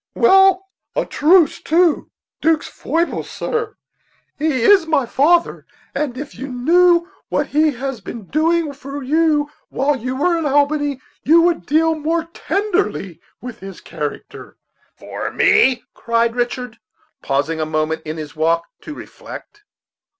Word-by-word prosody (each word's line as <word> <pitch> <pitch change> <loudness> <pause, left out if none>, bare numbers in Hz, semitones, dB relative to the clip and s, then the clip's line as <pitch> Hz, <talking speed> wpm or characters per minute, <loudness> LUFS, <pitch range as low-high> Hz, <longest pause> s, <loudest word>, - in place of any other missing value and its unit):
"Well, 385 -3 +5 0.3
a - - 0
truce 320 +1 +3
to 335 0 +2 0.3
'Duke's 320 0 +2
foibles, 335 +1 -2
sir; 455 -1 -3 0.6
he 290 -6 0
is 380 +1 +5
my 295 -5 +2
father, 330 +8 +1 0.3
and 270 -5 -3
if 290 +2 -7
you 265 +4 -7
knew 340 +7 +3 0.2
what - - 0
he 305 0 +2
has 260 -2 -5
been 220 +1 -8
doing 315 - 0
for 280 +1 -8
you 300 +1 +1 0.2
while 285 +2 0
we 250 +3 -4
were 335 +6 +1
in 315 - -1
Albany, 290 -1 +1 0.2
you 330 +3 +5
would 345 -1 0
deal 320 +2 +3
more 320 +2 -1
tenderly 385 - -2 0.2
with 245 -2 -8
his 195 -1 -9
character." 150 -2 -7 0.4
"For - - -6
me!" 265 - +3
cried 230 0 0
Richard, 245 -1 -3 0.4
pausing 145 +4 -1
a - - 0
moment 155 +1 -1
in 155 +1 -6
his 150 -1 -8
walk 165 +2 +1 0.2
to 305 - -8
reflect. 415 +6 -11
290 Hz, 140 wpm, -19 LUFS, 240-330 Hz, 0.6 s, Well